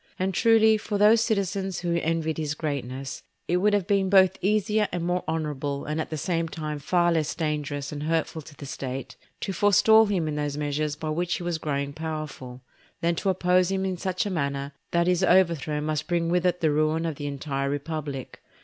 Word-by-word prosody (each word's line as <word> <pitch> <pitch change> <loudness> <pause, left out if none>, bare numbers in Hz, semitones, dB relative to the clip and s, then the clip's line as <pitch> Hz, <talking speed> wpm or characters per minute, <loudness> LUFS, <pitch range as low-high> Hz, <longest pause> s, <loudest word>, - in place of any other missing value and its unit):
And 190 +1 -1
truly, 220 +1 +5
for 210 -1 -3
those 215 +2 +6
citizens 195 -4 -1
who 170 -1 0
envied 160 -1 -1
his 150 -1 -2
greatness 135 -3 -4 0.3
it 175 - +2
would 205 +3 +2
have 205 -3 +2
been 195 -1 +1
both 190 -1 +5
easier 210 +1 +2
and 175 -1 -2
more 180 +1 0
honourable, 150 -3 -2
and 155 +2 -2
at - - -5
the 155 - -4
same 165 +2 -1
time 155 -2 -4
far 175 +4 +2
less 160 -3 0
dangerous 150 -3 -2
and 145 -1 -5
hurtful 160 +1 -1
to 150 0 -14
the 140 - -9
State, 135 -1 -5 0.3
to 195 - -2
forestall 210 +4 +5
him 185 -6 0
in 155 - -2
those 145 -1 -2
measures 150 0 -1
by 155 +1 -5
which 175 +2 -1
he - - -5
was 175 -2 -2
growing 140 -2 -2
powerful, 155 -5 -6 0.4
than 170 +1 +2
to 195 - 0
oppose 180 -1 +3
him 190 0 -1
in 190 -1 -1
such 185 +1 -2
a 205 - -2
manner 140 -4 -2 0.2
that 170 0 +2
his 180 +1 +2
overthrow 170 -5 +3
must 155 0 -2
bring 170 -1 0
with 180 +1 +2
it 180 0 0
the 160 -2 +3
ruin 155 +2 +1
of 160 -4 -3
the 145 - -4
entire 140 -1 -2
republic. 145 -2 -5
165 Hz, 205 wpm, -26 LUFS, 150-185 Hz, 0.4 s, those